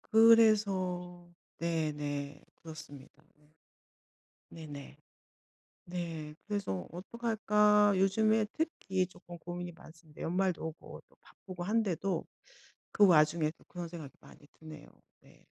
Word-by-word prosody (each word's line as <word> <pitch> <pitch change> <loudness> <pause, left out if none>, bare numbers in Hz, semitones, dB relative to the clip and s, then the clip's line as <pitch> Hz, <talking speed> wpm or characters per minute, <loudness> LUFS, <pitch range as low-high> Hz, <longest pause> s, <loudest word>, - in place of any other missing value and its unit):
..그래서 195 -6 +4 0.3
네네. 150 -3 -2
그렇습니다. 150 -3 -12
네. 150 0 -28 1.0
네네. 145 -4 -9 0.9
네, 165 -4 -5
그래서 195 - -3
'어떡할까?' 210 +1 +2
요즘에 215 +3 +3
특히 190 - -1
쪼끔 175 -1 -12
고민이 175 0 -6
많습니다. 160 -2 -15
연말도 180 -1 0
오고 160 - -10 0.2
바쁘고 180 -2 -9
한데도 195 -4 0 0.7
그 205 -1 +6
와중에 155 -1 +4
또 - - -22
그런 175 -1 -7
생각이 160 -5 -9
많이 145 - -17
드네요. 155 -2 -11 0.3
네. - - -22
175 Hz, 240 characters per minute, -32 LUFS, 155-200 Hz, 1.0 s, 그